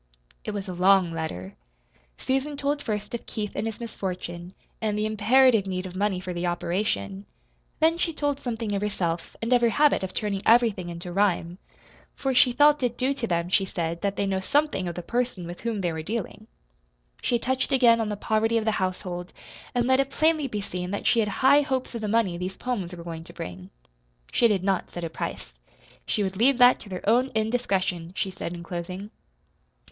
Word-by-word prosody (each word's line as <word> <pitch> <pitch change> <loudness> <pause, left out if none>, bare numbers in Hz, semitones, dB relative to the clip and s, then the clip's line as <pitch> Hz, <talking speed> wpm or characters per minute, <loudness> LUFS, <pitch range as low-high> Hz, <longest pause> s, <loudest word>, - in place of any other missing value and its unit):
It - - -5
was 200 -2 -4
a 185 - -4
long 185 0 +4
letter. 130 - -5 0.6
Susan 270 +2 -1
told 285 +1 -1
first 210 -1 -4
of 235 - -5
Keith 210 -2 -4
and 220 - -1
his 225 - -5
misfortune, 185 -5 -5 0.3
and 210 -2 0
the 210 - 0
imperative 220 0 +4
need 185 0 -3
of 185 -1 -8
money 195 -1 0
for 185 -1 -5
the 175 0 -2
operation. 195 +3 -2 0.5
Then 325 +2 +3
she 340 - +1
told 290 -3 -1
something 225 -5 -3
of 200 - -1
herself, 170 -5 -2
and 230 +3 +2
of 245 - +5
her 235 - +4
habit 290 +3 +3
of 190 -1 -4
turning 200 -2 -2
everything 225 -6 +4
into 175 +1 -6
rhyme; 180 -2 +1 0.6
for 270 -1 -1
she 250 0 +6
felt 295 +3 +5
it 245 -2 0
due 265 +2 +1
to 250 -4 -3
them, 170 -2 0
she 195 +1 +3
said, 170 -3 -3
that 200 -1 -1
they 200 - 0
know 195 -1 0
something 285 -3 +1
of 170 - -4
the 175 - -5
person 240 -6 -2
with 175 +1 -8
whom 225 -3 -2
they 175 -3 0
were 160 - -4
dealing. 215 +3 -5 0.7
She 240 - +1
touched 260 +3 -1
again 240 -4 +5
on 220 - -1
the 210 - -3
poverty 220 +2 +1
of 220 - -1
the 220 - +3
household, 180 -1 -3 0.4
and 240 -1 +2
let 260 +1 +4
it 275 0 +1
plainly 310 0 +2
be 210 -5 -3
seen 180 -2 -5
that 200 - -4
she 235 - +4
had 210 -2 +2
high 270 +7 +5
hopes 265 -3 -2
of 230 - -4
the 215 - -2
money 205 -5 +1
these 185 +1 -4
poems 195 -8 -3
were 170 - -9
going 165 -1 -6
to - - -12
bring. 90 +1 -7 0.6
She 235 - +4
did 200 -4 +1
not 190 -2 0
set 175 - -6
a 165 - -3
price. - - -5 0.5
She 210 - +1
would 190 -1 -3
leave 250 +4 +4
that 245 0 +7
to 205 - -11
their 185 +1 -6
own 245 +4 +4
indiscretion, 195 -7 0
she 195 - -1
said 180 - -5
in 170 - -8
closing. 180 +4 -6
205 Hz, 210 wpm, -26 LUFS, 180-240 Hz, 0.7 s, that